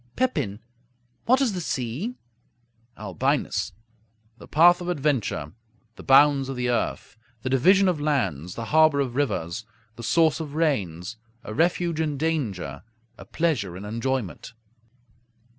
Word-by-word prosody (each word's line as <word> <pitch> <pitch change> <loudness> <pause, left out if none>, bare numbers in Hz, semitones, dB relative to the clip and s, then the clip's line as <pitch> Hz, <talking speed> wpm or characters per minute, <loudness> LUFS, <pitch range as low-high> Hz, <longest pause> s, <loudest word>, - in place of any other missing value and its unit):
Pepin 145 - -1 0.7
What 255 +3 +4
is 250 -6 +1
the 180 - -3
sea? 140 - -3 0.8
Albinus 95 -6 -1 0.7
The - - -12
path 175 +3 +5
of 175 - -4
adventure; 135 - -1 0.4
the - - -11
bounds 135 0 +5
of 135 - -4
the 125 0 0
earth; 120 - -2 0.3
the 130 - -2
division 190 +9 +5
of 170 -5 0
lands; 95 - -1
the 115 - -5
harbor 155 -2 +5
of 130 -3 -1
rivers; 110 - -1 0.3
the - - -7
source 160 +7 +2
of 150 -2 -6
rains; 110 - -1 0.3
a 110 - -7
refuge 170 +2 +1
in 150 -3 -1
danger; 110 - -2 0.4
a - - -10
pleasure 115 - -1
in 100 - -8
enjoyment. 115 -1 -3
135 Hz, 135 wpm, -25 LUFS, 110-160 Hz, 0.8 s, path